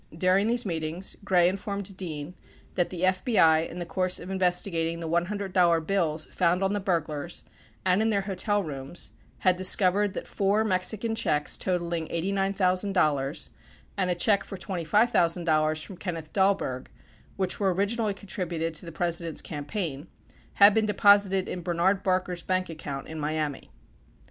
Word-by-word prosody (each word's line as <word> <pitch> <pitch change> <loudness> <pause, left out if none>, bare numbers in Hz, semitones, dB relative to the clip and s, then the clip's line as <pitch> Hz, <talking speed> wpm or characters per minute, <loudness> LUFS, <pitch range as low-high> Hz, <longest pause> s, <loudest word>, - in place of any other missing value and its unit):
During 185 +4 +3
these 240 +1 +1
meetings 165 +1 -2
Gray 180 -3 +4
informed 200 +1 -4
Dean 160 -3 -6 0.4
that 175 - 0
the 175 -2 -6
FBI, 185 -4 +3
in 175 - -9
the 175 - -4
course 185 +1 0
of 180 - -8
investigating 180 -3 0
the 165 - -5
$100 175 -1 +1
bills 165 -5 0
found 180 +1 +2
on 195 +1 +1
the 205 - 0
burglars 170 -4 -3 0.4
and 185 +2 +3
in 220 - +2
their 200 -2 +1
hotel 200 +1 -1
rooms, 140 +1 -6 0.3
had 185 -2 +4
discovered 185 +2 +2
that - - -5
four 200 +2 +1
Mexican 215 +3 0
checks 150 -9 +1
totaling 170 -3 -2
$89,000 185 -5 0 0.5
and 185 -3 0
a 180 - +1
check 200 +3 +3
for 195 - -8
$25,000 170 -5 +1
from 190 - -10
Kenneth 165 -5 -6
Dahlberg, 190 -10 +1 0.5
which 190 -2 -1
were 195 -2 +2
originally 205 +3 0
contributed 175 -4 -3
to 165 +2 -5
the - - -6
President's 170 -1 -2
campaign, 150 -1 -4 0.5
had 200 +1 +7
been 220 0 +2
deposited 200 -2 +4
in 180 - -4
Bernard 175 +3 +1
Barker's 185 -2 -1
bank 185 0 -1
account 145 -4 -6
in 160 0 -7
Miami. 150 -1 -3
180 Hz, 150 wpm, -27 LUFS, 165-195 Hz, 0.5 s, had